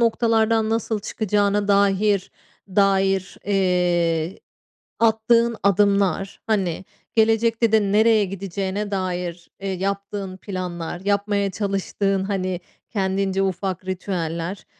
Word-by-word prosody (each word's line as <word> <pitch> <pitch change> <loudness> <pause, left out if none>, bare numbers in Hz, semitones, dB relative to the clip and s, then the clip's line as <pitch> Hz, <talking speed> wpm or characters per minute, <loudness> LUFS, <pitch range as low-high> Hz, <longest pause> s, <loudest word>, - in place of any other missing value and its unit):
noktalardan 225 -1 +2
nasıl 225 -1 -1
çıkacağına 205 -1 0
dahir 200 0 +2 0.4
dair, 195 -1 +2
eee, 180 -3 +1 0.6
attığın 230 +1 +3
adımlar, 200 -1 +2
hani, 190 -4 0 0.3
gelecekte 225 0 +3
de 220 -1 +5
nereye 220 0 +4
gideceğine 195 +2 -4
dair, 180 -3 -3
eee, 195 0 -3
yaptığın 195 0 -3
planlar, 180 -3 -5
yapmaya 200 0 +1
çalıştığın, 195 -1 -1
hani, 185 -2 -2 0.3
kendince 195 -1 0
ufak 190 -1 -2
ritüeller, 180 -1 -3
195 Hz, 95 wpm, -22 LUFS, 185-210 Hz, 0.6 s, de